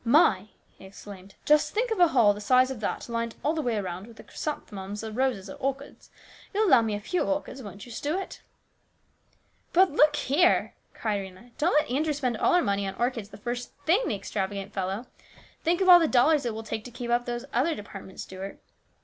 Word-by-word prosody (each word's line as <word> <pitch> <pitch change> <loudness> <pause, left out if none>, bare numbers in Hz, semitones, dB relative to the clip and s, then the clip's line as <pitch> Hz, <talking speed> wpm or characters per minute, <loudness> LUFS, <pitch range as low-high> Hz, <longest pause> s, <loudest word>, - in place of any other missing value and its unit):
"My!" 230 - +4 0.3
he - - -12
exclaimed; 195 0 -12
"just 300 +5 +3
think 470 +2 0
of 440 - -1
a 350 - +7
hall 235 -9 +4
the 205 - -8
size 255 +4 +4
of 260 - -6
that 215 - -3
lined 230 -1 -3
all 300 - +2
the 320 - -1
way 240 -5 -1
around 185 0 -4
with 230 -1 -15
chrysanthemums 205 -8 -5
or 220 - -5
roses 240 -4 -1
or 190 - -7
orchids! 275 +1 -5 0.5
You'll 430 +1 +3
allow 260 -8 +7
me 220 -2 -1
a - - -3
few 350 - -2
orchids, 290 -2 -2
won't 200 -3 -9
you, 240 - -12
Stuart? 310 +11 -4 0.6
" - - -42
" - - -39
But, 375 +1 +5
look 300 0 +4
here! 310 +6 +2
" - - -40
cried 210 -3 -1
Rhena. 190 +5 -12
" - - -34
Don't 330 +4 +2
let 300 -5 +2
Andrew 300 +4 +1
spend 255 -5 -1
all 350 - +3
our 355 - +4
money 200 0 0
on 195 - -5
orchids 240 -4 -2
the 200 - -12
first 240 +3 -5
thing, 360 +9 +4
the 215 - 0
extravagant 195 0 -4
fellow! 195 +4 -3 0.6
Think 345 +3 +1
of 375 - +2
all 355 -1 +10
the 330 - +2
dollars 275 +1 +3
it 225 - -3
will 225 - -5
take 220 0 -4
to - - -7
keep 240 0 -5
up 240 0 +1
these 240 +1 -3
other 290 +7 +2
depart 200 -1 -9
ments, 190 - -8
Stuart. 190 +1 -8
240 Hz, 225 wpm, -27 LUFS, 205-295 Hz, 0.6 s, all